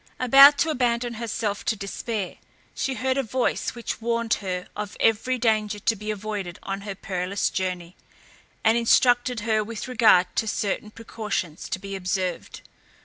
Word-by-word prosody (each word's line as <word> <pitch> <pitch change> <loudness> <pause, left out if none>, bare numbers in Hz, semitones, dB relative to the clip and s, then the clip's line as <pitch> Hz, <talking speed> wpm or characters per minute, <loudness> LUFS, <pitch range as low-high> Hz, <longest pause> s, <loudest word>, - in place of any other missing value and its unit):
About 275 +3 +8
to 320 - +1
abandon 240 -3 0
herself 220 -2 -3
to 225 - +1
despair, 200 0 -4 0.4
she 265 - -2
heard 260 +3 -1
a - - +3
voice 255 +1 -1
which 235 -1 -5
warned 235 0 0
her 180 -2 -3
of 210 -1 -6
every 225 +3 +2
danger 215 -3 +1
to 225 +2 0
be 210 +1 -7
avoided 205 -4 -4
on 195 0 -4
her 200 -1 -6
perilous 185 0 -2
journey, 180 -2 -3 0.7
and 225 +2 +4
instructed 245 0 +3
her 215 0 +1
with 225 +2 -6
regard 215 -7 +4
to 220 - +1
certain 210 0 -2
precautions 215 -7 -5
to - - -2
be 195 +1 -7
observed. 185 -1 -3
215 Hz, 155 wpm, -24 LUFS, 195-235 Hz, 0.7 s, About